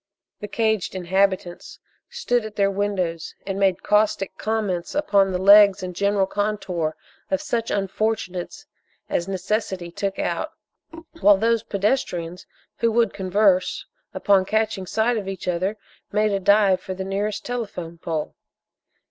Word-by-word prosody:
The 210 - -6
caged 220 -3 0
inhabitants 185 -1 -1 0.3
stood 470 - 0
at 215 -1 -8
their 200 -1 +2
windows 190 -5 -2
and 195 0 -3
made 195 -2 +2
caustic 210 -1 +1
comments 205 -4 -2
upon 200 -9 +3
the 180 - 0
legs 200 0 +7
and 180 -1 -5
general 200 +1 +2
contour 190 -6 -2 0.3
of 190 - +1
such 230 +1 -2
unfortunates 200 +3 -2 0.4
as 170 - -1
necessity 190 -2 -2
took 200 +1 -3
out, - - -2 0.7
while 205 -7 +6
those 230 +2 +2
pedestrians 190 -5 -2 0.3
who 230 -1 +1
would 230 +1 +2
converse, 190 -1 +1 0.3
upon 195 -2 +3
catching 215 -1 -1
sight 225 +4 +1
of 200 -3 -4
each 195 -1 -6
other 185 +4 -1 0.3
made 210 +1 +2
a 200 - 0
dive 200 -1 +4
for 185 - -6
the 190 0 -5
nearest 205 +2 -2
telephone 200 -9 -5
pole. 160 -2 -3
200 Hz, 140 wpm, -23 LUFS, 185-215 Hz, 0.7 s, legs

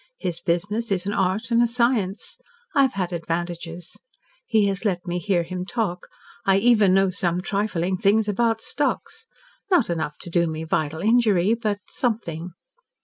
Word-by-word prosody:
His 175 - -3
business 205 +6 -1
is 190 -1 +1
an 200 - -1
art 195 +5 0
and 235 0 +4
a 240 - +4
science. 235 -5 0 0.3
I 280 - +4
have 265 -1 +3
had 185 -2 -2
advantages. 170 0 -4 0.5
He 215 -2 +3
has 195 +1 -1
let 180 -5 -1
me 175 0 -2
hear 175 -1 +1
him 180 +1 -5
talk. 190 -4 -3 0.4
I 195 0 +4
even 210 -3 +5
know 195 -1 +3
some 175 -1 -1
trifling 190 -2 -1
things 210 +2 +3
about 225 +2 +1
stocks. 375 - -2 0.4
Not 345 - +3
enough 155 -3 -3
to 175 - -7
do 170 0 +2
me 160 0 -4
vital 160 0 -1
injury 215 -3 +3
but 215 -3 -2
something. 180 -8 -3
195 Hz, 165 wpm, -24 LUFS, 175-220 Hz, 0.5 s, even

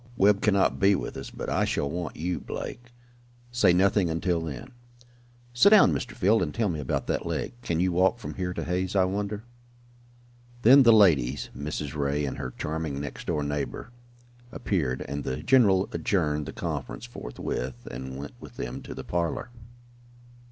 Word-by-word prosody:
Webb 100 +1 +4
cannot 100 -2 +2
be 100 0 +5
with - - -4
us, - - -6
but - - -7
I - - +1
shall 70 - 0
want 85 +3 -4
you, 90 +3 -2
Blake. 120 0 -7 0.6
Say 120 -6 +4
nothing 95 0 +3
until 85 +1 0
then. 80 - -6 0.8
Sit 120 +11 +6
down, 210 -2 +7
Mr. 125 - -4
Field, 110 0 +3
and 80 -5 -1
tell 110 +1 0
me 80 -3 -3
about 70 - -2
that - - -2
leg. - - -3
Can 85 -7 -1
you 90 +1 +2
walk 95 +6 +3
from 115 - -7
here 90 -1 -3
to 90 - -4
Hay's, 90 +2 -2
I 95 - +5
wonder?" 100 +3 -2 1.2
Then 135 +5 +8
the 120 -3 +7
ladies, 75 - +4
Mrs. 75 -1 -4
Ray 70 0 0
and 65 - -4
her 65 - -3
charming 75 -2 -3
next 70 0 -7
door 75 -3 0
neighbor, 75 - -4 0.6
appeared, 70 - -1
and 70 +1 -4
the 65 - -3
general 100 -8 +4
adjourned 75 -6 0
the - - -5
conference - - -5
forthwith, 60 - -5
and 65 +1 -6
went 70 +1 -7
with - - -12
them - - -5
to - - -8
the - - -6
parlor. 85 +6 -2
90 Hz, 175 wpm, -27 LUFS, 75-100 Hz, 1.2 s, Then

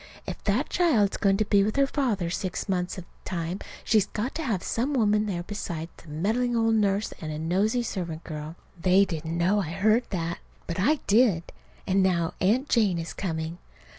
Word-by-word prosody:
"If - - -6
that 220 +8 +1
child 255 - +3
is - - -2
going 195 -1 +3
to 215 - +1
be 200 -1 +4
with 215 +2 -1
her 275 - +4
father 230 - -1
six 185 +2 -3
months 180 -1 -1
of 185 - -6
the - - -13
time, 175 +1 -3 0.2
she's 215 -3 +3
got 235 +6 -3
to 325 - -3
have 220 - -1
some 265 +5 -1
woman 210 -3 +3
there 175 -4 -2
beside 170 -4 -5
a 165 - -14
meddling 220 +11 0
old 225 0 +3
nurse 205 -1 +1
and 155 -1 -4
a 150 - -4
nosey 195 +9 +1
servant 170 -7 -4
girl!" 155 0 -6 0.3
They 190 +2 +5
didn't 165 -1 -4
know 190 +5 +3
I 165 - -4
heard 215 +7 +2
that. 170 -2 -2 0.3
But 170 +1 -4
I 285 +10 +2
did. 205 -6 +4 0.4
And 190 +1 +2
now 175 -3 +1
Aunt 230 +9 +2
Jane 210 -10 +3
is 165 0 -4
coming. 165 -2 -3
195 Hz, 200 wpm, -27 LUFS, 170-220 Hz, 0.4 s, They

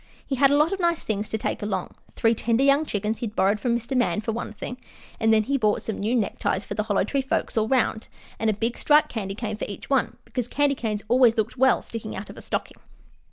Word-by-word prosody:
He - - -4
had 275 +1 +5
a 285 - +4
lot 305 +5 +3
of 390 - -3
nice 340 -2 +1
things 210 -1 -2
to 220 - -1
take - - -3
along. 195 -3 -2 0.2
Three 225 0 +3
tender 230 +3 +1
young 280 +2 +4
chickens 210 +2 -2
he'd 220 -3 -4
borrowed 200 +2 +2
from 235 +2 +1
Mr. 240 +3 -5
Man, 245 -3 +2
for 220 +1 -2
one 230 0 -4
thing, 245 +3 -7 0.4
and 225 -1 +3
then 220 -1 +4
he 275 +5 0
bought 210 -3 +1
some 220 - -4
new 220 +5 0
neckties 210 -3 0
for - - -6
the 215 - -1
Hollow 205 -3 +1
Tree 275 +7 0
folks 265 - -2
all 220 -1 +2
around, 235 -3 +1 0.3
and 225 - +1
a - - +2
big, 230 +4 -2
striped 300 0 +4
candy 195 -4 -4
cane 215 -1 -4
for - - -3
each 205 +6 -9
one, 270 -3 +1
because 250 -3 -3
candy 285 +2 +2
canes 215 -5 -3
always 245 0 +5
looked 220 +1 0
well 260 0 +3
sticking 225 -2 -6
out 195 +2 -7
of - - -14
a - - -8
stocking. - - -4
225 Hz, 250 wpm, -25 LUFS, 215-260 Hz, 0.4 s, had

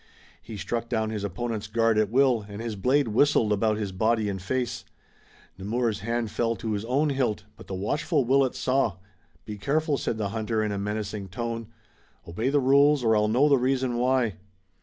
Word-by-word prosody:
He 110 -1 -9
struck 115 +3 -3
down 110 0 -1
his 105 -2 -4
opponent's 110 +2 -3
guard 115 0 +2
at 105 -2 +1
will, 125 -2 +3
and 100 0 -7
his 115 -1 -4
blade 130 +6 +2
whistled 115 -2 +3
about 105 +1 +1
his 105 -3 -3
body 110 +2 +1
and 95 -2 -4
face. 125 +3 -2 0.8
Nemours' 110 +2 -1
hand 115 0 -2
fell 115 -1 0
to 110 +2 -4
his 105 -1 -2
own 140 +5 +1
hilt, 130 -7 -1
but - - -14
the 95 - -4
watchful 140 - 0
Willet 135 0 +2
saw. 130 -6 0 0.5
"Be 105 -1 -7
careful," 150 - 0
the 110 -5 -2
hunter 110 +1 -1
said - - 0
in 105 - -2
a 100 - -3
menacing 105 0 -4
tone. 115 +3 -4 0.6
"Obey 110 +10 -1
the 145 +1 +3
rules 140 +1 +4
or 110 -1 +3
I'll 105 0 +3
know 125 +7 +3
the 140 -3 +4
reason 130 -1 0
why." 125 -4 +1
115 Hz, 190 wpm, -26 LUFS, 105-130 Hz, 0.8 s, rules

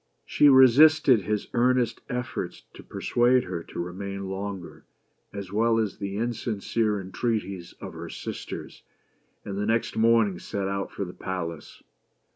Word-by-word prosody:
She 145 - +5
resisted 135 0 +7
his 105 0 -1
earnest 125 0 +2
efforts 125 -1 -4
to - - -11
persuade 125 +1 +2
her 90 -2 -5
to - - -9
remain 100 +2 -5
longer, 95 -2 -6 0.5
as 100 -2 -7
well 115 +2 +3
as 110 -3 -1
the 100 0 -4
insincere 110 -2 -1
entreaties 95 -2 -3
of - - -9
her - - -7
sisters, - - -7 0.6
and 100 0 -4
the 105 - -1
next 115 0 0
morning 110 -4 +3
set 100 -3 -3
out 100 0 -3
for 100 - -4
the 90 - -9
palace. 85 -5 -6
105 Hz, 140 wpm, -26 LUFS, 95-120 Hz, 0.6 s, resisted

